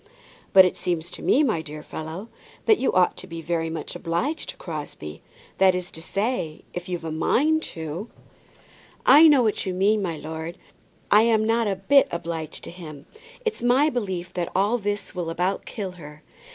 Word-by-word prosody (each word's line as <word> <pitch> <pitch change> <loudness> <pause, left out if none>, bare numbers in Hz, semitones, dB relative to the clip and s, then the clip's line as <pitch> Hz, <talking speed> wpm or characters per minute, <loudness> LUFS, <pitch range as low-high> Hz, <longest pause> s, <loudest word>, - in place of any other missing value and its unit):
"But 190 -1 +9
it 185 - 0
seems 175 -1 -2
to - - -7
me, 295 - +4
my 220 - +1
dear 150 -1 -8
fellow, 160 +8 -7 0.4
that 435 -3 +5
you 270 - +2
ought 180 -1 +3
to - - -8
be 165 0 -7
very 165 0 -1
much 160 - -5
obliged 180 - -2
to - - -7
Crosbie; 145 - -7 0.4
that 190 -1 +5
is 180 -1 -3
to 160 - -8
say, 195 -3 -2
if 175 +1 -6
you've 175 -2 -3
a 160 - -4
mind 305 - +2
to 165 +7 -5 0.5
" - - -27
"I 325 - +9
know 285 -5 +6
what 215 -3 0
you 185 - -2
mean, 205 +3 +3
my 170 -5 -2
lord. 160 +2 -6 0.5
I 210 - +8
am 220 -1 +3
not 230 0 +2
a 195 - 0
bit 270 +9 +4
obliged 165 -2 -5
to - - -8
him. 155 -5 -10 0.4
It's 450 -1 -1
my 260 +6 +4
belief 190 -7 -3
that 175 -1 -3
all 205 +6 +2
this 205 -1 -3
will 175 -3 -3
about 180 +4 -1
kill 200 -4 -4
her. 150 -4 -12
180 Hz, 190 wpm, -24 LUFS, 165-220 Hz, 0.5 s, But